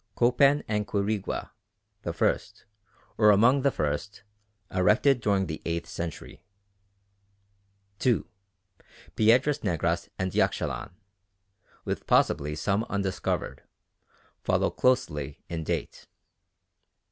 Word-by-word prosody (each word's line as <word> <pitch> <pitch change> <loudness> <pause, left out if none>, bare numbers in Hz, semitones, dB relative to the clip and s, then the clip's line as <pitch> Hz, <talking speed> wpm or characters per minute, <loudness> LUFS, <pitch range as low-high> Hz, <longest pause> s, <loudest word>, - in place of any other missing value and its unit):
Copan 135 +4 +4
and 105 -1 -1
Quirigua, 100 0 -2 0.5
the - - -3
first, - - -1 0.5
or 105 -1 +6
among 120 +7 +5
the 140 - +3
first, 80 - -3 0.5
erected 110 +8 +3
during 100 -3 +1
the 80 -2 -6
eighth 85 0 -3
century. 85 -2 -7 1.6
2. 125 -4 +2 0.9
Piedras 130 +7 +3
Negras 85 -3 -1
and 95 0 -2
Yaxchilan, - - -1 1.0
with - - -4
possibly 75 +1 +2
some 100 +6 0
undiscovered, 100 -4 -2 0.8
follow - - +1
closely 75 - 0
in 85 -2 -3
date. - - -4
100 Hz, 95 wpm, -27 LUFS, 85-120 Hz, 1.6 s, or